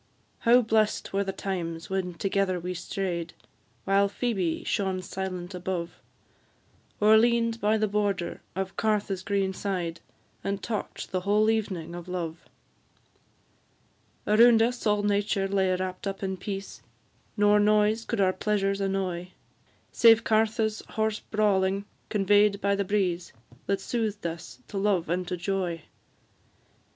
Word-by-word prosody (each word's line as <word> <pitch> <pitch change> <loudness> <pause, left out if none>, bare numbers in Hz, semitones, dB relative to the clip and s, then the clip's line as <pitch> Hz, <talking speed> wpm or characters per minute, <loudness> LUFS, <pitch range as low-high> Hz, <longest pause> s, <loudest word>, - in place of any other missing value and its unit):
How 245 +2 +5
blest 215 -2 +1
were 200 +1 +1
the 195 - -3
times 170 -4 -4
when 185 -2 -2
together 195 +1 0
we 180 +1 -4
stray'd, 180 -1 -3 0.5
While 200 +1 +3
Phoebe 195 -7 -1
shone 190 -2 -1
silent 185 -1 -5
above, 180 -1 -4 1.0
Or 215 +1 +6
lean'd 230 0 +2
by 215 +1 +3
the 215 0 +1
border 200 -3 -1
of 190 0 -3
Cartha's 205 -3 0
green 195 -1 0
side, 180 -4 -3 0.4
And 200 0 -3
talk'd 215 -3 -4
the 185 - 0
whole 210 +4 +3
evening 190 -7 -2
of 175 0 -8
love! 170 -2 -5 1.8
Around 225 +1 +6
us 240 0 -1
all 210 0 +2
nature 205 -1 +1
lay 190 -1 +1
wrapt 185 +1 -4
up 195 0 -4
in 190 0 -1
peace, 195 +1 -6 0.6
Nor 205 0 +5
noise 210 +2 +3
could 230 -1 -3
our 190 -1 +3
pleasures 200 0 0
annoy, 185 -2 -2 0.6
Save 225 -1 +6
Cartha's 220 0 +1
hoarse 220 -1 -1
brawling, 200 -2 +1 0.2
convey'd 205 0 +3
by 200 0 +1
the 200 - 0
breeze, 185 -3 -1 0.3
That 195 0 +1
soothed 215 -1 -3
us 170 +9 -6
to 200 - -4
love 195 -5 +1
and 180 +1 -1
to 180 - -3
joy. 175 -3 -2
195 Hz, 135 wpm, -27 LUFS, 185-210 Hz, 1.8 s, Or